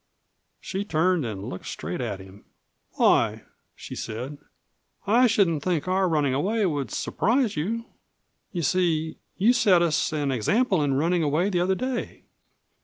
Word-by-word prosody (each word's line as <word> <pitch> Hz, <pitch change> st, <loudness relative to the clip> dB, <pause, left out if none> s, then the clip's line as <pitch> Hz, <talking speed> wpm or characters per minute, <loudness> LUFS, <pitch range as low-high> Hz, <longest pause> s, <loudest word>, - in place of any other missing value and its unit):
She 195 Hz, +1 st, -4 dB
turned 170 Hz, -, +1 dB
and 100 Hz, -2 st, -6 dB
looked 90 Hz, -, -7 dB
straight 85 Hz, +10 st, -5 dB
at 105 Hz, -5 st, -3 dB
him. 95 Hz, +2 st, -14 dB, 0.5 s
"Why," -, -, +2 dB, 0.3 s
she -, -, -9 dB
said, 125 Hz, +6 st, -6 dB, 0.7 s
"I 235 Hz, +5 st, +5 dB
shouldn't 190 Hz, -9 st, +2 dB
think 175 Hz, -1 st, -1 dB
our 185 Hz, 0 st, +2 dB
running 150 Hz, -5 st, +1 dB
away 200 Hz, +10 st, +1 dB
would 145 Hz, -, -1 dB
surprise 230 Hz, -, 0 dB
you. 225 Hz, +10 st, -2 dB, 0.7 s
You 175 Hz, -3 st, -3 dB
see, 160 Hz, -1 st, 0 dB, 0.2 s
you 220 Hz, +6 st, +4 dB
set 195 Hz, -8 st, +4 dB
us 160 Hz, -2 st, +1 dB
an 145 Hz, -3 st, -1 dB
example 190 Hz, -, +1 dB
in 140 Hz, -2 st, +1 dB
running 170 Hz, +5 st, +1 dB
away 160 Hz, +6 st, +1 dB
the 180 Hz, -, +1 dB
other 185 Hz, +2 st, +2 dB
day." 255 Hz, +3 st, -4 dB
170 Hz, 150 wpm, -25 LUFS, 140-195 Hz, 0.7 s, I